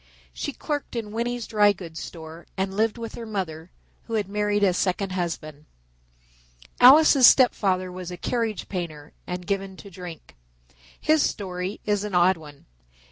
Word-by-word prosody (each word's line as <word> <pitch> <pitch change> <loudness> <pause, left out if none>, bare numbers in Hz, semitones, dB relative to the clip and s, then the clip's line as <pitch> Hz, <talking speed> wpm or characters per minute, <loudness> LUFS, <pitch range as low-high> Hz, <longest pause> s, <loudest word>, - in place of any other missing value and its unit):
She - - -4
clerked 290 -4 -4
in 220 -3 -4
Winney's 235 +1 -2
Dry 210 -2 +4
Goods 170 -4 -9
Store 160 0 -9
and 190 0 -1
lived 220 +3 0
with 230 -1 -6
her 230 - -7
mother, 175 -6 -4 0.4
who 230 - -4
had 210 -3 0
married 205 0 0
a 190 -2 +4
second 185 +1 -1
husband. 160 -4 -4 1.1
Alice's 270 0 +8
step 255 -2 +6
father 185 -2 -1
was 180 -1 -7
a 180 - -7
carriage 225 +2 -2
painter, 160 -5 -6
and 180 0 -5
given 195 -1 -3
to 200 - -12
drink. 175 - -10 0.6
His 310 0 +3
story 185 -2 -3
is 205 -1 0
an 210 -3 -4
odd 180 +1 +4
one. 150 -3 -14
195 Hz, 160 wpm, -25 LUFS, 175-220 Hz, 1.1 s, Alice's